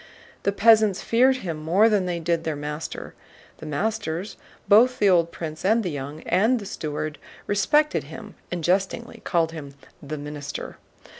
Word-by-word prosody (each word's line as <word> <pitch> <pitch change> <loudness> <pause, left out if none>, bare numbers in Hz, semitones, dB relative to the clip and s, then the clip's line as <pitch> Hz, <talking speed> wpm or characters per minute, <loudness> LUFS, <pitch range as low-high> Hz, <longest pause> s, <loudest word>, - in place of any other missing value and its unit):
The 200 - +1
peasants 215 -1 +4
feared 255 +3 +4
him 165 -3 -3
more 170 +8 +3
than 205 -4 +2
they 175 -1 -2
did 165 0 -1
their 160 -2 -2
master. 150 +2 -6 0.5
The 155 - -8
masters, 180 +2 -2 0.3
both 245 +5 +6
the 205 - +3
old 170 -3 +4
prince 155 -2 -6
and 220 +4 +3
the 180 - -2
young, 145 +2 -6
and 220 +8 +2
the 210 - -7
steward 155 -4 -4 0.3
respected 295 +10 +2
him - - -10 0.2
and 175 -2 -3
jestingly 195 +7 -1
called 165 -2 +1
him 140 -4 -9 0.3
"the 155 +1 -6
Minister." 145 0 -7
175 Hz, 160 wpm, -24 LUFS, 155-215 Hz, 0.5 s, both